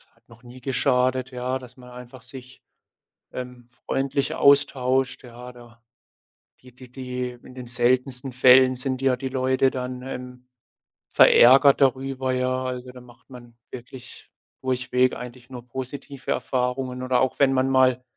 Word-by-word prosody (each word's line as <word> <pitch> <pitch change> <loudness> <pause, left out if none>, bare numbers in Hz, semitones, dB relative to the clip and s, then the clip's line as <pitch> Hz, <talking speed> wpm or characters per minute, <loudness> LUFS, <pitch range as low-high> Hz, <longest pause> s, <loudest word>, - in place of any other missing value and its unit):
hat - - -34
noch 115 +1 -18
nie 125 +1 -13
geschadet, 130 0 0
ja, 125 +1 -3
dass 125 -1 -14
man 125 -1 -14
einfach 125 0 -12
sich, 125 +2 -13 0.7
ähm, 125 -1 -9 0.2
freundlicher 135 +1 -2
austauscht, 135 -2 +2
ja, 125 +1 -11
da 120 -1 -17 0.8
die 125 -1 -17
die 125 -1 -15
die 125 -1 -6
in - - -14
den 125 -1 -9
seltensten 125 +2 -1
Fällen 130 0 +5
sind 130 0 -3
ja 135 -1 +3
die 130 +1 -5
Leute 130 0 +1
dann, 125 -1 -6
ähm, 125 -1 -9 0.7
verärgert 135 +3 +6
darüber, 130 0 0
ja. 130 0 -1
Also, 125 0 -5
da 125 0 -13
macht 120 -1 -20
man 120 -2 -14 0.2
wirklich 125 0 -12 0.3
durchweg 130 0 0
eigentlich 125 +1 -11
nur 125 -2 -10
positive 130 +2 -7
Erfahrungen 125 0 -2
oder 130 -1 +1
auch 130 - -1
wenn 135 -1 +3
man 130 0 +1
mal 130 -1 +3
125 Hz, 150 wpm, -23 LUFS, 125-130 Hz, 0.8 s, verärgert